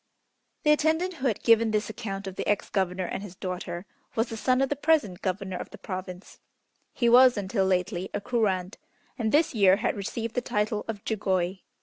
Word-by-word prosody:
The 300 - +5
attendant 320 +5 +2
who 270 - 0
had 220 - -1
given 230 -1 +5
this 215 0 0
account 200 -2 -5
of 190 -1 -6
the - - -4
ex 205 - 0
governor 185 -2 0
and 190 - -4
his 195 -3 -9
daughter, 180 -1 -5 0.3
was 225 +1 +1
the 225 - -5
son 255 +3 +2
of 270 0 +2
the 290 - 0
present 285 - +1
Governor 190 -1 -2
of - - -7
the - - -11
Province. 185 -1 -7 0.5
He 235 - 0
was 250 0 +7
until 195 -1 0
lately 185 0 0
a - - -2
Kurand, 200 -4 -1 0.4
and 220 -2 0
this 305 +2 +3
year 195 -4 +5
had 225 +4 -1
received 225 +3 -4
the 250 - 0
title 210 -2 -1
of 215 -3 -6
Jugoi. 190 -3 0
210 Hz, 200 wpm, -27 LUFS, 190-235 Hz, 0.5 s, was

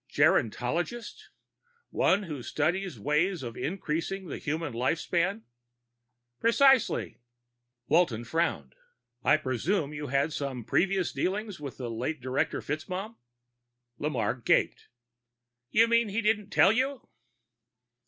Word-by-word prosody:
"Gerontologist? 165 - 0 0.6
One 200 +2 +2
who 150 -8 -6
studies 175 +9 -1
ways 155 +2 +1
of 120 -1 -6
increasing 185 +2 -3
the 160 - -6
human 155 -2 -3
life 125 +7 +1
span?" 185 +7 -1 1.0
"Precisely." 270 +2 +3 0.7
Walton 150 -9 +2
frowned. 165 +8 -1 0.5
"I - - +5
presume 150 - -1
you've 150 -2 -5
had 140 +3 +1
some 135 -5 -4
previous 190 -1 +1
dealings 195 +6 -2
with 140 -3 -7
the 120 -3 -5
late 130 +7 -3
Director 130 +2 -1
FitzMaugham?" 185 +9 -4 0.8
Lamarre 145 -4 -1
gaped. - - +2 0.8
"You 225 +8 +5
mean 230 -1 +3
he 210 +3 -1
didn't 210 -1 +1
tell 195 - +5
you?" 260 +3 -1
165 Hz, 115 wpm, -29 LUFS, 140-200 Hz, 1.0 s, I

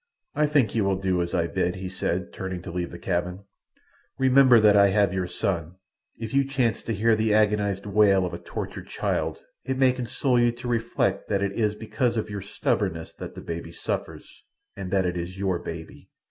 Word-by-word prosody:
"I 150 - +2
think 140 -8 +2
you 110 - +1
will 100 0 +2
do 95 -2 0
as 85 - -2
I 85 -2 +2
bid," 90 0 -1
he 95 0 -5
said, 90 0 -3
turning 95 -2 -5
to 90 - -7
leave 85 0 -3
the 85 - -9
cabin. 90 +1 -2 0.7
"Remember 130 -2 +6
that 105 -1 +6
I 100 0 +7
have 100 -1 +2
your 95 -1 -1
son—if 95 - -5
you 140 0 +4
chance 130 -4 0
to 115 - -3
hear 110 +3 +3
the 110 -1 +2
agonized 105 -2 +1
wail 100 -2 +4
of 90 - -5
a - - -5
tortured - - -6
child - - -2 0.2
it 130 +1 -2
may 130 -1 +5
console 125 +1 0
you 120 0 +4
to 125 +1 -8
reflect 115 -4 0
that 100 -1 +1
it 100 - 0
is 105 0 0
because 115 +2 -1
of 110 -1 -2
your 100 -1 -4
stubbornness 80 -4 -2
that - - -7
the - - -7
baby 85 0 -6
suffers—and 95 +2 -7
that 95 0 +2
it 90 0 -1
is 90 +2 -5
your 95 -3 0
baby." 80 -1 -8
100 Hz, 200 wpm, -25 LUFS, 90-115 Hz, 0.7 s, I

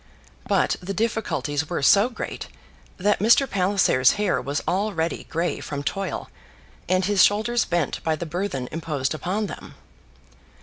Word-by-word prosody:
But - - +2
the 195 +2 -5
difficulties 175 -9 -1
were - - -2
so 200 - +5
great 250 - -6 0.5
that 205 +2 +1
Mr. 235 +6 +5
Palliser's 185 - +3
hair 205 -3 0
was 140 +2 -3
already 185 -3 -1
grey 170 +2 -2
from 145 -1 -5
toil, 195 +7 -3 0.6
and 185 0 +2
his 200 -2 +4
shoulders 220 +3 +2
bent 170 -5 -1
by 160 -1 +1
the 170 - -5
burthen 160 -6 -3
imposed 150 -4 -2
upon 190 +7 -2
them. - - -9
185 Hz, 140 wpm, -24 LUFS, 155-205 Hz, 0.6 s, so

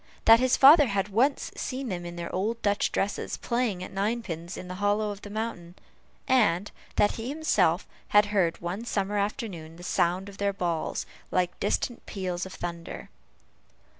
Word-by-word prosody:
That 225 0 +8
his 255 0 +3
father 290 +1 +8
had 200 -1 -1
once 250 +8 +1
seen 260 -1 -4
them 175 -2 -4
in 175 - -7
their 170 0 -6
old 220 +5 -1
Dutch 205 0 +1
dresses 200 +1 -2
playing 235 -7 -1
at - - -8
ninepins 195 -4 -3
in 180 - -7
the 180 - -5
hollow 205 +1 +1
of 205 0 -8
the 205 - -9
mountain; 205 -5 -5 0.5
and 205 -7 +3 0.2
that 205 - +2
he 230 +2 -4
himself 205 - +2 0.2
had 210 0 +5
heard, 175 -5 +2
one 180 +6 -4
summer 205 -2 -1
afternoon, 190 -6 -4
the 175 - -12
sound 180 +2 +1
of 200 -1 -11
their 200 0 +1
balls, 170 -4 -2 0.2
like 180 -1 0
distant 230 +4 -1
peals 185 -2 -3
of 190 - -11
thunder. 170 -1 -6
200 Hz, 170 wpm, -27 LUFS, 175-225 Hz, 0.5 s, That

